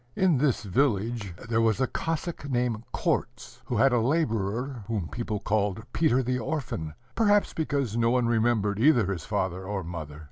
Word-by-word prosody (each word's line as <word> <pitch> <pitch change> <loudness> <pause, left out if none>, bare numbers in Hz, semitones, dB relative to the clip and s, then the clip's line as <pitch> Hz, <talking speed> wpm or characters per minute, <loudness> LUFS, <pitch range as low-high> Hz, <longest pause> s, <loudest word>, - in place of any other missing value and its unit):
In 180 -8 +3
this 135 -5 +1
village 110 -3 0
there 115 0 +2
was 115 0 +2
a 130 - +3
Cossack 160 +1 -3
named 120 -3 0
Korzh, - - -2
who - - -2
had 135 -1 +4
a 120 - +4
laborer 120 -2 0
whom 105 -8 -2
people 110 -1 -3
called 105 0 0
Peter 130 -5 +3
the 125 +1 -1
Orphan 110 - -3 0.2
perhaps 205 -2 +3
because 140 -8 -1
no 115 0 +3
one 125 0 +2
remembered 110 -3 +1
either 120 -7 +4
his 85 - -7
father 95 -3 -2
or 95 0 -3
mother. 80 -3 -7
115 Hz, 170 wpm, -27 LUFS, 100-135 Hz, 0.2 s, had